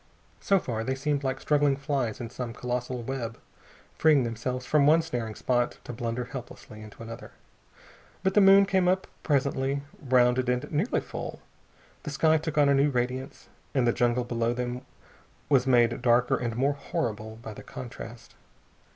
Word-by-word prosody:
So 195 Hz, -, +3 dB
far 115 Hz, -10 st, -3 dB
they 130 Hz, +3 st, -1 dB
seemed 140 Hz, +1 st, -1 dB
like 135 Hz, 0 st, -1 dB
struggling 145 Hz, -2 st, +2 dB
flies 135 Hz, -5 st, -2 dB
in 120 Hz, -2 st, -6 dB
some 125 Hz, -2 st, -5 dB
colossal 125 Hz, 0 st, -3 dB
web, 120 Hz, -2 st, -4 dB, 0.6 s
freeing 150 Hz, -4 st, +5 dB
themselves 120 Hz, +2 st, -3 dB
from 145 Hz, 0 st, +3 dB
one 160 Hz, +2 st, +5 dB
snaring 120 Hz, -9 st, -4 dB
spot 120 Hz, -1 st, 0 dB
to 120 Hz, -, -7 dB
blunder 120 Hz, +1 st, -3 dB
helplessly 120 Hz, -4 st, -9 dB
into 110 Hz, +1 st, -11 dB
another. 115 Hz, 0 st, -9 dB, 0.9 s
But 190 Hz, 0 st, +2 dB
the 210 Hz, -, +5 dB
moon 195 Hz, 0 st, +7 dB
came 190 Hz, -2 st, +2 dB
up 185 Hz, +1 st, +2 dB, 0.2 s
presently, 140 Hz, -1 st, 0 dB, 0.2 s
rounded 125 Hz, -2 st, +3 dB
and 125 Hz, 0 st, -1 dB
nearly 165 Hz, +10 st, 0 dB
full. -, -, -6 dB, 0.6 s
The 150 Hz, -, -6 dB
sky 155 Hz, +2 st, +3 dB
took 155 Hz, 0 st, -5 dB
on 145 Hz, -1 st, +5 dB
a 140 Hz, -, +5 dB
new 140 Hz, +2 st, +4 dB
radiance, 130 Hz, +1 st, -3 dB, 0.3 s
and 130 Hz, -3 st, +3 dB
the 120 Hz, -, +3 dB
jungle 120 Hz, 0 st, +1 dB
below 120 Hz, 0 st, -1 dB
them 125 Hz, 0 st, -3 dB, 0.7 s
was 135 Hz, -2 st, +3 dB
made 120 Hz, -1 st, +3 dB
darker 120 Hz, 0 st, +3 dB
and 120 Hz, -2 st, -3 dB
more 135 Hz, +4 st, +2 dB
horrible 110 Hz, -5 st, -4 dB
by 110 Hz, -1 st, -9 dB
the -, -, -10 dB
contrast. 120 Hz, -2 st, -9 dB
125 Hz, 170 wpm, -27 LUFS, 120-140 Hz, 0.9 s, moon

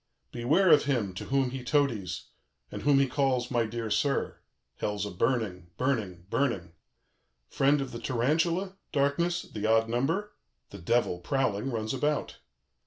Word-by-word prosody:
"Beware 155 Hz, +10 st, +3 dB
of 150 Hz, -2 st, +6 dB
him 120 Hz, -9 st, 0 dB
to 90 Hz, -, -6 dB
whom 135 Hz, -2 st, +1 dB
he 130 Hz, -1 st, -5 dB
toadies, 125 Hz, -, 0 dB, 0.4 s
and -, -, -6 dB
whom 145 Hz, -1 st, +4 dB
he 135 Hz, 0 st, +4 dB
calls 130 Hz, -2 st, 0 dB
'My 120 Hz, -3 st, +1 dB
dear 115 Hz, -1 st, -4 dB
sir.' 135 Hz, +7 st, 0 dB, 0.4 s
Hell's 105 Hz, -1 st, -2 dB
a 105 Hz, -, -5 dB
burning, 100 Hz, -4 st, -1 dB
burning, 105 Hz, -10 st, -1 dB
burning. 105 Hz, -12 st, 0 dB, 0.8 s
"Friend 140 Hz, +2 st, +3 dB
of 135 Hz, -, -4 dB
the 115 Hz, -, -6 dB
tarantula, 165 Hz, +11 st, 0 dB
darkness, 170 Hz, +5 st, +1 dB
the 105 Hz, 0 st, -4 dB
odd 115 Hz, 0 st, +4 dB
number, 165 Hz, -, -1 dB, 0.4 s
the 100 Hz, -, -9 dB
Devil, 90 Hz, -1 st, +1 dB
prowling, 130 Hz, 0 st, 0 dB
runs 110 Hz, -2 st, -2 dB
about. 145 Hz, +3 st, -1 dB
125 Hz, 150 wpm, -29 LUFS, 110-140 Hz, 0.8 s, of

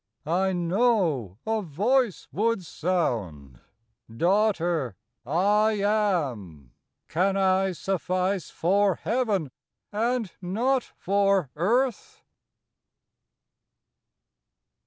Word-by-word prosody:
I 185 Hz, +5 st, +1 dB
know 175 Hz, -, +1 dB
a 220 Hz, 0 st, 0 dB
Voice 210 Hz, -, 0 dB
would 215 Hz, -2 st, 0 dB
sound, 105 Hz, -, -2 dB, 0.3 s
" 115 Hz, 0 st, -19 dB
Daughter, 175 Hz, -, +1 dB, 0.3 s
I 205 Hz, +8 st, +3 dB
AM. 155 Hz, -, -1 dB, 0.4 s
Can 190 Hz, +4 st, +1 dB
I 190 Hz, 0 st, +2 dB
suffice 185 Hz, -2 st, -1 dB
for 195 Hz, +2 st, +2 dB
Heaven, 205 Hz, -, -1 dB, 0.4 s
and 230 Hz, -1 st, -1 dB
not 240 Hz, +8 st, 0 dB
for 195 Hz, -6 st, +1 dB
earth 235 Hz, -, 0 dB
190 Hz, 75 wpm, -26 LUFS, 160-210 Hz, 0.4 s, I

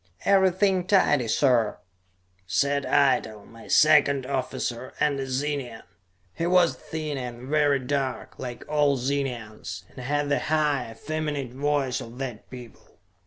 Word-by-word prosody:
"Everything 190 Hz, -1 st, +3 dB
tidy, 150 Hz, -, +3 dB
sir," 120 Hz, -3 st, +2 dB, 0.7 s
said 140 Hz, +9 st, +1 dB
Eitel, 110 Hz, -7 st, +2 dB
my 115 Hz, 0 st, -14 dB
second 140 Hz, -3 st, +4 dB
officer, 130 Hz, -2 st, -3 dB
and 145 Hz, -2 st, +1 dB
a 135 Hz, -, -3 dB
Zenian. 130 Hz, -3 st, -3 dB, 0.5 s
He 165 Hz, -, -2 dB
was 180 Hz, -2 st, +4 dB
thin 155 Hz, -3 st, -5 dB
and 125 Hz, 0 st, -7 dB
very 145 Hz, -1 st, +3 dB
dark, 135 Hz, -2 st, -3 dB
like 125 Hz, -2 st, -6 dB
all 145 Hz, -2 st, +2 dB
Zenians, 120 Hz, -, -4 dB
and -, -, -13 dB
had 145 Hz, +2 st, -1 dB
the 140 Hz, -, +2 dB
high, 150 Hz, -5 st, 0 dB
effeminate 145 Hz, 0 st, -4 dB
voice 140 Hz, -1 st, 0 dB
of 120 Hz, 0 st, -10 dB
that 130 Hz, -5 st, -6 dB
people. 125 Hz, -3 st, -13 dB
140 Hz, 130 wpm, -25 LUFS, 125-150 Hz, 0.7 s, second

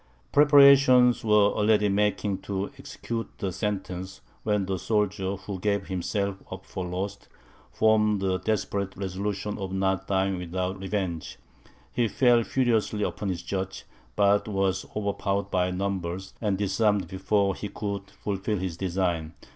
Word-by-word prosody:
Preparations 140 Hz, -4 st, +6 dB
were 105 Hz, -2 st, +4 dB
already 105 Hz, 0 st, +3 dB
making 100 Hz, -1 st, 0 dB
to 100 Hz, 0 st, -4 dB
execute 115 Hz, -1 st, -5 dB
the 95 Hz, -4 st, -2 dB
sentence, 95 Hz, -, -4 dB, 0.2 s
when 105 Hz, -2 st, 0 dB
the 95 Hz, -1 st, -2 dB
soldier, 105 Hz, -2 st, 0 dB
who 95 Hz, 0 st, -7 dB
gave 100 Hz, 0 st, 0 dB
himself 100 Hz, +2 st, -2 dB
up -, -, -7 dB
for 95 Hz, -, -5 dB
lost, 95 Hz, +3 st, -4 dB, 0.4 s
formed 105 Hz, -1 st, +3 dB
the 95 Hz, -1 st, 0 dB
desperate 100 Hz, -2 st, -2 dB
resolution 100 Hz, +2 st, -3 dB
of 95 Hz, -1 st, -4 dB
not 95 Hz, -1 st, 0 dB
dying 95 Hz, -1 st, +1 dB
without 90 Hz, +2 st, -3 dB
revenge. 95 Hz, -4 st, -3 dB, 0.6 s
He 120 Hz, -2 st, +2 dB
fell 120 Hz, +1 st, +4 dB
furiously 115 Hz, -4 st, +1 dB
upon 100 Hz, -, -2 dB
his 90 Hz, -2 st, -3 dB
judge, 95 Hz, -1 st, -4 dB, 0.3 s
but 100 Hz, +1 st, +3 dB
was 95 Hz, -2 st, 0 dB
overpowered 100 Hz, -1 st, -1 dB
by 90 Hz, 0 st, +1 dB
numbers, 95 Hz, -1 st, -3 dB
and 105 Hz, -4 st, 0 dB
disarmed 100 Hz, -1 st, +1 dB
before 100 Hz, +2 st, +1 dB
he 105 Hz, -, -6 dB
could 100 Hz, -1 st, -5 dB
fulfil 105 Hz, +1 st, -3 dB
his 90 Hz, -3 st, -4 dB
design. 85 Hz, -4 st, -1 dB
100 Hz, 140 wpm, -27 LUFS, 95-105 Hz, 0.6 s, Preparations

